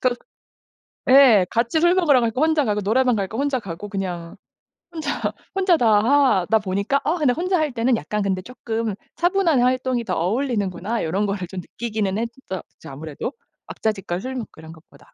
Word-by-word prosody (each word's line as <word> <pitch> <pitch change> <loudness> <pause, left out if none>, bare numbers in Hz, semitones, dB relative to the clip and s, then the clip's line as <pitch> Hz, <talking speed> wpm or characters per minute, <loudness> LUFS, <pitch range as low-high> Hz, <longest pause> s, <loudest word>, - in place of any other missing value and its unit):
그 250 -1 +2 0.9
네. 255 -8 +7
같이 235 +7 +1
술 345 +1 +4
먹으러 300 -9 +4
갈 230 -1 +1
거 255 - -3
혼자 315 -2 +3
가고 210 -2 0
노래방 250 +4 +2
갈 200 -2 -1
거 220 - -7
혼자 280 -1 0
가고. 195 -1 -7
그냥 180 -4 -5 0.5
혼자, 315 -3 -3 0.4
혼자 375 -3 +3
다 240 - +2 0.2
하다 230 -6 +3
보니까. 200 +7 0
'아 320 - +2
근데 290 -6 +3
혼자 365 +5 0
할 310 -2 0
때는 240 +1 +2
약간 210 -1 -3
근데 190 -2 -1
쪼끔 225 -1 -4 0.2
차분한 350 -6 +2
활동이 255 -1 +1
더 185 -4 -2
어울리는구나.' 210 0 -1
요런 190 +6 0
거를 195 -2 -3
좀 185 0 -6
느끼기는 210 -1 -3
했었죠. 230 -5 -7
아무래도 145 +2 -6 0.4
왁자지껄 195 -5 -3
술 260 +3 -5
먹고 240 -4 -5
이런 160 0 -11
것보다. 160 0 -20
230 Hz, 355 characters per minute, -22 LUFS, 195-270 Hz, 0.9 s, 네